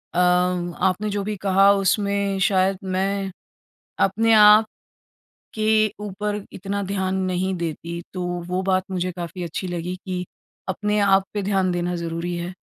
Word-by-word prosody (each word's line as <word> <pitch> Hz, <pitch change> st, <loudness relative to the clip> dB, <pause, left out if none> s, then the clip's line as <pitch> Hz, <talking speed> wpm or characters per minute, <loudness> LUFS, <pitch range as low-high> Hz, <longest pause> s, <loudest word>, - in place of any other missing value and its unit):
अम, 180 Hz, 0 st, +2 dB
आपने 190 Hz, +3 st, +1 dB
जो 205 Hz, -1 st, -2 dB
भी 210 Hz, +1 st, -3 dB
कहा 195 Hz, 0 st, +5 dB
उसमें 200 Hz, 0 st, 0 dB
शायद 190 Hz, 0 st, +2 dB
मैं 195 Hz, +1 st, -1 dB, 0.7 s
अपने 225 Hz, +4 st, +2 dB
आप 210 Hz, +1 st, +8 dB, 0.9 s
के 215 Hz, 0 st, +3 dB, 0.2 s
ऊपर 210 Hz, +1 st, -3 dB
इतना 200 Hz, +2 st, -3 dB
ध्यान 190 Hz, -1 st, -1 dB
नहीं 185 Hz, +1 st, -1 dB
देती 170 Hz, +1 st, -4 dB
तो 180 Hz, -1 st, -3 dB, 0.2 s
वो 180 Hz, +1 st, -1 dB
बात 185 Hz, -1 st, +1 dB
मुझे 185 Hz, 0 st, -1 dB
काफ़ी 175 Hz, +1 st, -6 dB
अच्छी 170 Hz, +2 st, -4 dB
लगी 175 Hz, +1 st, -4 dB
कि 180 Hz, -1 st, -3 dB, 0.5 s
अपने 210 Hz, +2 st, 0 dB
आप 195 Hz, -1 st, +4 dB
पे 205 Hz, -, -1 dB
ध्यान 190 Hz, -2 st, +1 dB
देना 175 Hz, 0 st, -1 dB
ज़रूरी 170 Hz, +1 st, -3 dB
है 175 Hz, +2 st, -5 dB
190 Hz, 145 wpm, -23 LUFS, 180-200 Hz, 0.9 s, आप